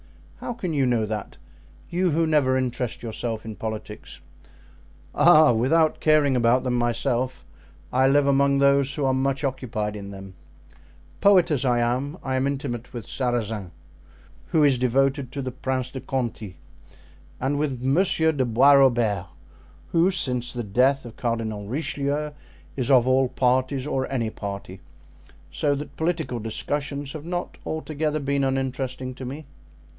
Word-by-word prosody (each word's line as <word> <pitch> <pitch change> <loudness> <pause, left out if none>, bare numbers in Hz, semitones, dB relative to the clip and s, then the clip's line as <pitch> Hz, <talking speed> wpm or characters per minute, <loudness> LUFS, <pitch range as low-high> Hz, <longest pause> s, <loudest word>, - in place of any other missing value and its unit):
"How 245 - -4
can 185 -8 -4
you 135 -3 +2
know 120 -3 +1
that? 105 -1 -5 0.5
You 180 +1 +1
who 165 +1 +2
never 145 -5 +2
interest 125 -2 -3
yourself 115 -1 -4
in 110 -1 -6
politics?" 110 +1 -7 0.9
"Ah! 155 -3 +6
without 155 +8 +2
caring 150 -3 +3
about 120 +1 +3
them 125 -1 -1
myself, 120 -1 -1 0.5
I 130 +1 +4
live 140 +1 +4
among 140 0 +3
those 140 0 +3
who 145 - -1
are 130 - +2
much 135 +1 0
occupied 115 -6 -2
in 100 -1 -7
them. 95 -1 -10 0.9
Poet 185 -4 +5
as 140 -4 +1
I 125 -2 +2
am, 125 +6 -1
I 135 - -2
am 130 +1 +1
intimate 130 -4 -4
with 120 -3 -7
Sarazin, 115 -6 -2 0.8
who 155 - +2
is 135 -4 +4
devoted 135 +1 +1
to 140 -2 -4
the 130 - -3
Prince 130 0 -3
de 130 - -6
Conti, 115 - -4 0.8
and 140 +3 -1
with 140 -4 -1
Monsieur 160 +3 +3
de 140 -4 0
Bois 125 +4 +5
Robert, 120 -9 +3 0.6
who, 170 +2 +4
since 125 -9 -1
the 120 -1 -4
death 130 +6 +2
of 120 - -10
Cardinal 110 -4 -3
Richelieu, 145 +3 -2 0.4
is 130 -3 -2
of 130 -3 +5
all 130 0 +3
parties 130 +1 +1
or 130 -2 -2
any 115 -5 -1
party; 100 -3 -7 0.7
so 145 -1 0
that 145 +2 -7
political 160 -7 -2
discussions 140 +5 -3
have 155 -1 -8
not 175 +1 -4
altogether 155 -1 -2
been 140 0 0
uninteresting 130 -1 -2
to 130 0 -8
me." 140 +5 -7
130 Hz, 150 wpm, -24 LUFS, 120-145 Hz, 0.9 s, Ah